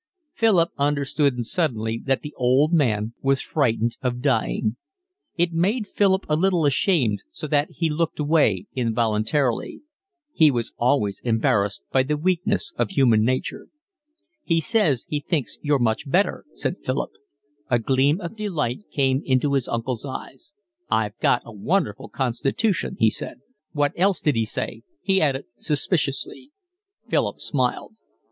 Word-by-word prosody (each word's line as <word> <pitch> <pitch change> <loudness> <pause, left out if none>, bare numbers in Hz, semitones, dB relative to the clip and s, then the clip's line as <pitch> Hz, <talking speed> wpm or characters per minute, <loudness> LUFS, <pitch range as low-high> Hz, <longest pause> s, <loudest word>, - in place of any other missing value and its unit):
Philip 195 -8 +3
understood 140 -3 +1
suddenly 115 -7 -1
that 135 -1 0
the 150 - -7
old 130 +6 +3
man 115 -8 +1
was 135 0 +2
frightened 120 -6 0
of 125 -1 -1
dying. 120 -4 0 0.6
It 175 0 +1
made 205 +7 +1
Philip 195 -1 +2
a 150 - +2
little 175 -1 +2
ashamed, 135 - +2
so 155 - -7
that 145 0 +1
he 165 - -1
looked 165 +2 -1
away 145 - +2
involuntarily. 115 - 0 0.5
He 155 -3 +6
was 120 -4 -2
always 120 -5 +1
embarrassed 105 -4 +1
by 130 - +4
the 150 +3 -1
weakness 185 +5 0
of - - 0
human 125 - +3
nature. 130 +3 -2 0.8
"He 165 -1 +2
says 160 - +1
he 150 - -1
thinks 145 - -3
you're 145 -1 +2
much 120 +3 0
better," 185 +8 +1
said - - -2
Philip. - - -2 0.6
A 120 - +4
gleam 135 - +2
of 175 +5 -6
delight 180 - -3
came 135 -1 +1
into 135 +2 +1
his 135 -3 +1
uncle's 115 0 -3
eyes. 135 +4 -8 0.4
"I've 105 0 0
got - - +2
a 115 - -10
wonderful 115 - -1
constitution," 135 - -1
he 110 -1 +4
said. - - -4 0.3
"What 145 -2 +1
else 190 +1 +2
did 150 - +1
he 115 -2 0
say?" - - -4 0.2
he 190 -1 +2
added 140 -3 +1
suspiciously. 150 - -1 0.6
Philip - - 0
smiled. 130 - -2
140 Hz, 145 wpm, -23 LUFS, 120-165 Hz, 0.8 s, He